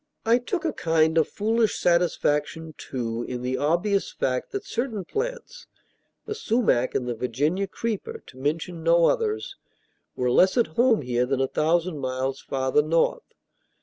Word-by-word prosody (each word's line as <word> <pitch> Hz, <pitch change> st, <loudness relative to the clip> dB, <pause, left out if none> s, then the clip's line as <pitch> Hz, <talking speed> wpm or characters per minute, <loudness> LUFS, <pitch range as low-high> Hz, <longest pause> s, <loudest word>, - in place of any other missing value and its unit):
I 230 Hz, +2 st, +4 dB
took 340 Hz, +8 st, -3 dB
a 320 Hz, -, 0 dB
kind 160 Hz, -1 st, +2 dB
of 160 Hz, -, +2 dB
foolish 220 Hz, +1 st, 0 dB
satisfaction, 160 Hz, -2 st, +1 dB
too, 115 Hz, -3 st, -4 dB
in 125 Hz, -1 st, -4 dB
the 130 Hz, +1 st, -1 dB
obvious 175 Hz, +7 st, +1 dB
fact 130 Hz, -1 st, -2 dB
that 400 Hz, 0 st, -4 dB
certain 235 Hz, -, -3 dB
plants 485 Hz, -, -5 dB, 0.6 s
the -, -, -3 dB
sumach 225 Hz, -, +1 dB
and 125 Hz, -, -1 dB
the 120 Hz, -, -1 dB
Virginia 145 Hz, -, -1 dB
creeper, 230 Hz, -, -4 dB
to 130 Hz, -, -15 dB
mention 160 Hz, +4 st, -2 dB
no 170 Hz, +1 st, +4 dB
others 430 Hz, -2 st, 0 dB, 0.6 s
were 125 Hz, -1 st, 0 dB
less 185 Hz, -, +4 dB
at 235 Hz, -, +3 dB
home 235 Hz, -, +3 dB
here 125 Hz, 0 st, 0 dB
than 135 Hz, 0 st, 0 dB
a 135 Hz, -, +3 dB
thousand 165 Hz, +2 st, 0 dB
miles 130 Hz, 0 st, -2 dB
farther 130 Hz, +2 st, +1 dB
north. 165 Hz, -, 0 dB
165 Hz, 155 wpm, -25 LUFS, -, 0.6 s, I